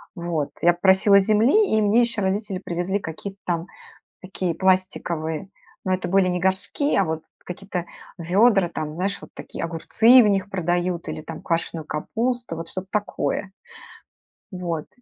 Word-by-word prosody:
Вот, 170 -4 -2
я 175 +1 +5
попросила 190 +3 +5
земли, 220 - +4
и 220 - +3
мне 210 +3 +4
еще 235 -3 0
родители 195 0 -1
привезли 180 +3 -2
какие-то 195 +3 -7
там 170 -1 -1 0.6
такие 185 -2 -3
пластиковые, 175 -2 0 0.4
ну 185 - 0
это 185 -1 -1
были 190 +1 +3
не 180 0 0
горшки, 190 - 0
а 195 - +3
вот 160 -1 -3 0.2
какие-то 180 -1 -5 0.3
ведра, 190 +2 +3
там, 155 -2 -5
знаешь, 190 +4 -2
вот - - -11
такие, - - -7
огурцы 220 +10 +5
в - - +3
них 200 -1 +1
продают 175 -1 -1
или - - -5
там 160 +1 -8
квашеную 165 -1 -2
капусту, 235 +7 -2
вот 165 0 -6
что-то 185 0 -5
такое. 205 -2 -2 1.0
Вот. 170 -4 -4
185 Hz, 150 wpm, -23 LUFS, 170-200 Hz, 1.0 s, я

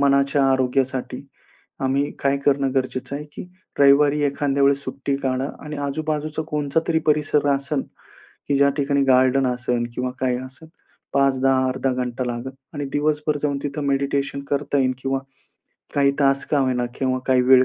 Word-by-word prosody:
मनाच्या 140 0 +3
आरोग्यासाठी 130 -1 0 0.6
आम्ही 135 +2 +1
काय 140 0 +1
करणं 140 -1 +2
गरजेचं 130 +1 -2
आहे 150 - -6
की - - -7 0.4
रविवारी 140 +1 +5
एखाद्या 140 0 0
वेळेस 140 0 +3
सुट्टी 140 0 -2
काढा 130 0 -1 0.2
आणि 150 0 -6
आजूबाजूचा 155 +1 -2
कोणचा 150 0 0
तरी 160 -1 +3
परिसर 150 -1 +2
आसन, 140 0 0 0.6
की 145 - 0
ज्या 140 0 +5
ठिकाणी 140 -1 +1
गार्डन 130 0 +4
असेल 125 -1 -1
किंवा 125 +1 -2
काय 125 -1 +1
असेल, 130 +5 -10 0.4
5-10 135 -1 +3
अर्धा 130 0 -1
घंटा 125 0 -2
लागेल 120 +2 -4 0.2
आणि 145 - -3
दिवसभर 150 0 0
जाऊन 145 -1 0
तिथं 145 0 -3
मेडिटेशन 140 0 0
करता 145 0 0
येईल 130 -1 +2
किंवा 135 +1 -1 0.8
काही 140 -1 +4
तास 135 -1 +3
का 150 - +3
होईना 125 -2 0
किंवा 130 -1 0
काही 130 -1 +4
वेळ 130 0 +6
140 Hz, 155 wpm, -22 LUFS, 130-145 Hz, 0.8 s, वेळ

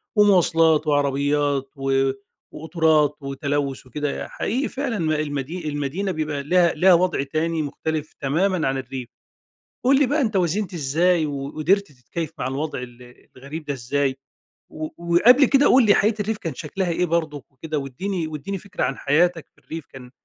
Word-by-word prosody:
ومواصلات 165 -6 +4
وعربيات 145 -1 +1
و 135 -1 +1 0.4
وقُطُرات 160 -2 +1
وتلوث 140 -1 -3
وكده. 145 +2 -4
حقيقي 260 +6 -2
فعلًا 265 -5 -3 0.2
المدي 150 +3 -3
المدينة 145 +7 -2
بيبقى 150 -3 -3
لها 175 +2 +3
لها 180 +4 +5
وضع 175 -5 +2
تاني 160 +3 -1
مختلف 155 +1 -4
تمامًا 165 +4 +1
عن 135 0 0
الريف. 130 -2 -6 0.7
قل 270 +2 +4
لي 285 - +4
بقى 290 +3 +1
أنتَ 220 -5 -1
وازنت 185 +2 0
إزاي، 165 +3 +2
وقدرت 155 +7 -1
تتكيف 140 +4 -6
مع 125 - -1
الوضع 140 +2 -3
ال 125 0 -13
الغريب 145 +4 -8
دا 145 - -2
إزاي؟ 135 +2 -1 0.5
و 155 0 -5 0.3
وقبل 250 +10 +7
كده 275 +2 +4
قل 255 -2 +6
لي 205 - +6
حياة 215 +2 +3
الريف 210 +1 -1
كان 165 -5 -5
شكلها 175 +5 -3
إيه 180 +2 +1
برضُك 155 -5 -2
وكده؟ 155 +3 -4
واديني 165 +6 -3
واديني 155 +6 -5
فكرة 200 +1 -4
عن 135 +1 -1
حياتك 165 +3 +1
في - - -35
الريف 160 -2 -8
كان 125 -2 -12
155 Hz, 155 wpm, -23 LUFS, 140-180 Hz, 0.7 s, وقبل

